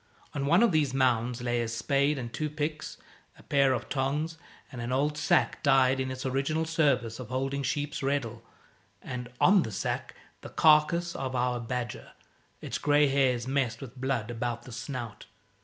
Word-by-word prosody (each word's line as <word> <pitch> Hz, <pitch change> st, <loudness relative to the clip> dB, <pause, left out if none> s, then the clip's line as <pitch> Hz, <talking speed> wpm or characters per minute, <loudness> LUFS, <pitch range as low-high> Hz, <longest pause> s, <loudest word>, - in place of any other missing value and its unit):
On 140 Hz, -1 st, -2 dB
one 170 Hz, +9 st, +5 dB
of 235 Hz, -, +4 dB
these 145 Hz, -5 st, +1 dB
mounds 125 Hz, -2 st, +1 dB
lay 120 Hz, -1 st, 0 dB
a 115 Hz, -, -2 dB
spade 140 Hz, +5 st, +1 dB
and 120 Hz, -3 st, -6 dB
two 155 Hz, -1 st, -2 dB
picks, 155 Hz, +1 st, -4 dB, 0.4 s
a -, -, -17 dB
pair 140 Hz, -2 st, +3 dB
of 125 Hz, -, -2 dB
tongs, 145 Hz, +4 st, -1 dB, 0.4 s
an 120 Hz, -2 st, -5 dB
old 145 Hz, +3 st, +1 dB
sack, 150 Hz, -, +1 dB
dyed 135 Hz, 0 st, +4 dB
in 130 Hz, 0 st, -1 dB
its 130 Hz, 0 st, -5 dB
original 140 Hz, +5 st, 0 dB
service 140 Hz, -9 st, +1 dB
of 125 Hz, -, -7 dB
holding 135 Hz, +2 st, -2 dB
sheep's 145 Hz, +3 st, -2 dB
reddle, 135 Hz, -5 st, -1 dB, 0.6 s
and, 125 Hz, -1 st, -6 dB
on 195 Hz, 0 st, +6 dB
the 110 Hz, -, -4 dB
sack, 100 Hz, -, -3 dB, 0.3 s
the -, -, -9 dB
carcase 165 Hz, +2 st, +3 dB
of 130 Hz, -1 st, -3 dB
our 125 Hz, 0 st, 0 dB
badger, 120 Hz, 0 st, -5 dB, 0.5 s
its -, -, -4 dB
grey 145 Hz, -1 st, +4 dB
hairs 130 Hz, -3 st, +1 dB
messed 130 Hz, -4 st, 0 dB
with 130 Hz, -2 st, -9 dB
blood 130 Hz, -4 st, -2 dB
about 120 Hz, 0 st, -3 dB
the 125 Hz, -, -11 dB
snout. 120 Hz, -3 st, -6 dB
135 Hz, 175 wpm, -29 LUFS, 120-145 Hz, 0.6 s, on